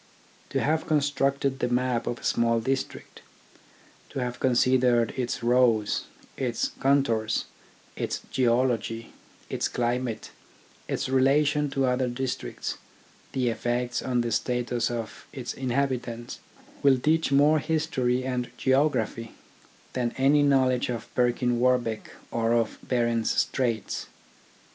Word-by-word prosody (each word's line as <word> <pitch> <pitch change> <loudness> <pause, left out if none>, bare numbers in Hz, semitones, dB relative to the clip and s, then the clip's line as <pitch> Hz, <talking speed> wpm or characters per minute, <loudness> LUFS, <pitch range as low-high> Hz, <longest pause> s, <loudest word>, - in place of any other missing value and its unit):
To - - 0
have 155 +2 0
constructed 140 -2 +1
the - - +1
map 125 -1 0
of 120 - -2
a - - -15
small 115 0 +2
district, 135 +3 -3 0.9
to - - -8
have 125 -1 -3
considered 125 -2 +3
its 125 0 -3
roads, 120 -3 +3 0.3
its 120 -3 -1
con 140 +1 +4
tours, 110 -3 -1 0.5
its - - -3
geology, 115 -2 0 0.3
its - - -1
climate, 120 -1 -2 0.6
its - - -2
relation 145 +3 +3
to 135 -1 0
other 125 0 +1
districts, 130 +1 -4 0.5
the 125 -2 +1
effects 120 +1 -1
on 125 -2 0
the 120 0 -2
status 120 +1 0
of 115 -2 -6
its 125 -3 -5
inhabi 130 0 0
tants, 120 0 -7 0.4
will 135 -2 +5
teach 155 +3 +1
more 145 +3 +5
history 145 -5 0
and 125 -2 -2
geography 130 -5 +1 0.6
than 120 -2 -1
any 140 +3 +4
knowledge 130 -3 +3
of 115 -2 -5
Perkin 120 0 +1
Warbeck 120 -3 +1 0.2
or 115 0 +1
of 115 -2 0
Behren's 120 -2 +1
Straits. 115 -5 -1
125 Hz, 125 wpm, -27 LUFS, 120-135 Hz, 0.9 s, will